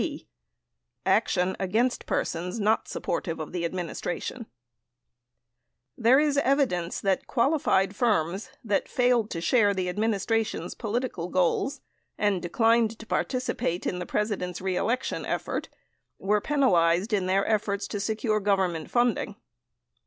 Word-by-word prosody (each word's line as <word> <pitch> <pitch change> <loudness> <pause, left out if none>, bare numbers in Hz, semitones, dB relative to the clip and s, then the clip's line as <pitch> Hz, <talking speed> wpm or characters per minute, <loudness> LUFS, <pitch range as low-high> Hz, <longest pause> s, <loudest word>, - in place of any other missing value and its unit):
88 - - -2
b. - - -20 0.8
Action 180 +1 +2
Against 225 +7 0
Persons 180 +5 -2
Not 215 +1 +2
Supportive 165 -1 -3
of 155 - -5
the 175 -1 -3
Administration 180 +6 -4 1.5
There 245 +4 +5
is 290 -2 +2
evidence 255 -12 +1
that 195 -2 0
qualified 235 -7 +2
firms 200 -2 0
that 210 -4 0
failed 245 -3 +2
to 165 - -4
share 205 0 +3
the 185 -1 -1
ad 180 +3 -3
ministration's 220 -4 0
political 220 -6 -3
goals 185 +9 +1 0.4
and 205 -4 +1
declined 225 +4 +2
to 220 - -11
participate 250 -8 -1
in 180 - -1
the 180 - -5
Presi 210 -1 -1
dent's 180 -1 -4
reelection 195 +7 -1
effort - - -3 0.5
were 205 +2 +1
penalized 195 - +2
in 190 -3 +1
their 195 +1 +2
efforts 205 -2 0
to 205 - -3
secure 215 +1 0
Government 190 -6 0
funding. 240 0 +1
205 Hz, 130 wpm, -27 LUFS, 180-235 Hz, 1.5 s, There